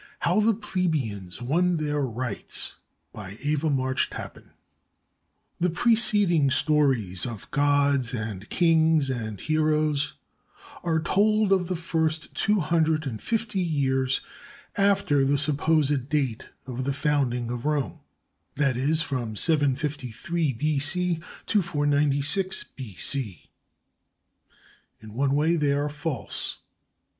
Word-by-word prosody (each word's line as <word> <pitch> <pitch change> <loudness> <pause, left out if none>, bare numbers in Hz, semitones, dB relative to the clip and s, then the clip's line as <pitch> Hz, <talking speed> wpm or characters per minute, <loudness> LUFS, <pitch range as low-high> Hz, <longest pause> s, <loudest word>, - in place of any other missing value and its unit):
HOW - - +2
THE 220 0 +3
PLEBEIANS 140 - -3
WON 175 +7 +2
THEIR 150 -1 -1
RIGHTS 125 +1 -3 0.4
BY 100 -1 -8
EVA 150 +1 0
MARCH 130 -2 0
TAPPAN - - -9 1.1
The 180 - +2
preceding 205 -6 +3
stories 130 - +1
of 115 -4 -8
gods 145 -3 +2
and 110 -4 -5
kings 160 -4 +3
and 110 -5 -4
heroes 155 -2 +1 0.7
are 165 -2 0
told 210 +5 +2
of 185 -3 +3
the 185 - -2
first 160 -1 -2
two 210 -2 +1
hundred 160 -1 +1
and 115 -5 -5
fifty 225 -3 -1
years 135 -6 0 0.5
after 195 -8 +2
the 140 +1 +2
supposed 145 -2 +1
date 135 -6 -1 0.2
of 130 0 -4
the 140 +1 -1
founding 130 -5 0
of 120 +1 -5
Rome, 150 -3 -1 0.6
that 140 -3 +1
is, 150 +6 +1
from 120 -7 -3
753 145 +2 +1
B.C. 155 +6 +1 0.3
to 210 - +2
496 145 +3 +1
B.C. 115 - -3 1.5
In 110 -1 -12
one 135 +3 +1
way 160 +4 +2
they 145 -2 +2
are 145 +1 0
false. 150 -4 -3
145 Hz, 115 wpm, -26 LUFS, 130-165 Hz, 1.5 s, THE